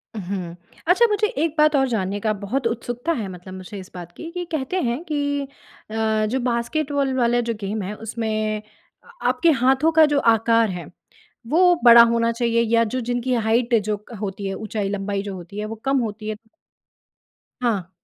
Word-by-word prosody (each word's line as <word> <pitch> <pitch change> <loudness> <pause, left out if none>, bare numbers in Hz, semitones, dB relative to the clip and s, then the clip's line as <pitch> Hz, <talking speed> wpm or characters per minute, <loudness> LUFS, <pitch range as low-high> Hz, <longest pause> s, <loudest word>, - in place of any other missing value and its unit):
उहुँ। 185 -4 -5 0.3
अच्छा 370 +7 +5
मुझे 420 0 +2
1 330 -8 -2
बात 305 0 +4
और 270 -1 +3
जानने 205 -4 -1
का 215 -1 +2
बहुत 235 +5 -1
उत्सुकता 240 +5 -3
है 225 -9 -3
मतलब 185 +1 -10
मुझे 185 +2 -8
इस 185 - -11
बात 175 -1 -9
की 330 - -7
कि 355 0 -4
कहते 315 +4 -1
हैं 240 +5 -1
कि 285 -3 -1 0.5
अ, 220 -1 +1
जो 245 +5 -1
बास्केटबॉल 275 +3 -1
वाला 240 -1 +2
जो - - +1
गेम 205 +2 -3
है, 195 +3 -4
उसमें 215 -1 -2 0.4
आ - - -19 0.2
आपके 335 - +3
हाथों 265 +5 +4
का 320 - +9
जो 285 - +3
आकार 230 0 +2
है, 170 - -7 0.6
वो 355 +7 +5
बड़ा 235 -1 +10
होना 230 0 +2
चाहिए 235 0 +1
या 230 - +5
जो 255 - 0
जिनकी 245 +1 0
हाइट 235 +2 +2
जो 210 0 -1
क 240 - -10
होती 200 -1 -4
है 195 - -3
ऊँचाई-लंबाई 200 -1 -3
जो 200 -1 -6
होती 180 +2 -9
है 210 - -2
वो 220 - -5
कम 270 0 +2
होती 215 -2 -4
है। 215 - -3 1.3
हाँ। 200 -7 0
230 Hz, 185 wpm, -22 LUFS, 205-270 Hz, 1.3 s, बड़ा